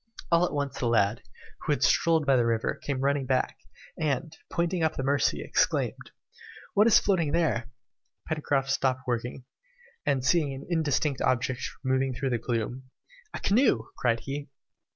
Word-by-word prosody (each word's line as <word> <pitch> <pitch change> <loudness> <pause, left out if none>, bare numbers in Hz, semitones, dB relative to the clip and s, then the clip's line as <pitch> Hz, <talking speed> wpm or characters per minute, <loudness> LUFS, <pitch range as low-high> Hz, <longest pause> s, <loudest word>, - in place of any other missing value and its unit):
All 170 +1 +5
at - - -7
once, 140 -2 -3
the 120 - 0
lad, 110 -2 +2 0.4
who 155 - -2
had - - -2
strolled 165 -2 +3
by 135 -1 +4
the 120 - +3
river, 115 -1 0
came 135 -2 -2
running 140 -1 +1
back, 130 -1 0 0.4
and, 155 +1 -1 0.2
pointing 175 0 0
up 160 -1 +1
the 135 - -3
Mercy, 140 +1 +1
exclaimed, - - 0 0.6
"What 210 +3 +5
is 230 - +7
floating 170 -7 +1
there?" 150 -9 +1 0.6
Pencroft 140 -3 0
stopped 130 -1 +1
working, 125 +1 -3 0.6
and 130 -2 0
seeing 145 -1 +2
an 135 - -9
indistinct 150 -4 0
object 130 0 0 0.2
moving 130 -1 +1
through 135 +1 -2
the 120 - 0
gloom, 120 +3 -3 0.5
"A - - -4
canoe!" 200 - +2
cried 115 -2 0
he. 140 +1 -5
135 Hz, 160 wpm, -28 LUFS, 125-155 Hz, 0.6 s, is